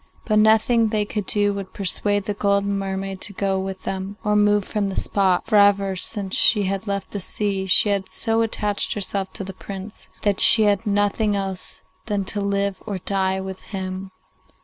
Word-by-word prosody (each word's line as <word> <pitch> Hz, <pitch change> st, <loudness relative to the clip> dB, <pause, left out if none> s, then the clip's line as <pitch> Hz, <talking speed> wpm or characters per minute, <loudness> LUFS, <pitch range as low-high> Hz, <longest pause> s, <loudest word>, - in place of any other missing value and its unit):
But 215 Hz, -1 st, +2 dB
nothing 220 Hz, +2 st, +4 dB
they 210 Hz, -1 st, 0 dB
could 205 Hz, -1 st, -4 dB
do 205 Hz, -1 st, +2 dB
would 195 Hz, -1 st, -7 dB
persuade 205 Hz, +1 st, 0 dB
the 210 Hz, -, -2 dB
golden 200 Hz, 0 st, 0 dB
mermaid 195 Hz, 0 st, -4 dB
to 205 Hz, -, -3 dB
go 195 Hz, 0 st, -1 dB
with 190 Hz, 0 st, -6 dB
them 195 Hz, +1 st, -5 dB
or 210 Hz, -1 st, +1 dB
move 205 Hz, -1 st, +3 dB
from 205 Hz, -2 st, -2 dB
the 190 Hz, -, -2 dB
spot, 190 Hz, -3 st, +1 dB
for 215 Hz, -, +2 dB
ever 200 Hz, -1 st, +4 dB
since 195 Hz, +1 st, -3 dB
she 210 Hz, -3 st, +5 dB
had 195 Hz, +2 st, -3 dB
left 200 Hz, -1 st, -3 dB
the 205 Hz, -, -4 dB
sea, 195 Hz, 0 st, -2 dB
she 200 Hz, +3 st, +4 dB
had 200 Hz, -2 st, -1 dB
so 225 Hz, 0 st, 0 dB
attached 210 Hz, -2 st, -1 dB
herself 195 Hz, -1 st, -3 dB
to 195 Hz, -, -2 dB
her 195 Hz, -, -7 dB
Prince 195 Hz, +2 st, -9 dB
that 205 Hz, -2 st, +1 dB
she 220 Hz, -2 st, +7 dB
asked 205 Hz, +2 st, 0 dB
nothing 205 Hz, +1 st, +1 dB
else 195 Hz, -2 st, -5 dB, 0.2 s
than 205 Hz, -3 st, -1 dB
to 205 Hz, +2 st, -1 dB
live 200 Hz, -1 st, -1 dB
or 200 Hz, -3 st, -3 dB
die 190 Hz, 0 st, 0 dB
with 190 Hz, 0 st, -7 dB
him. 190 Hz, -1 st, -6 dB
200 Hz, 195 wpm, -22 LUFS, 190-205 Hz, 0.2 s, she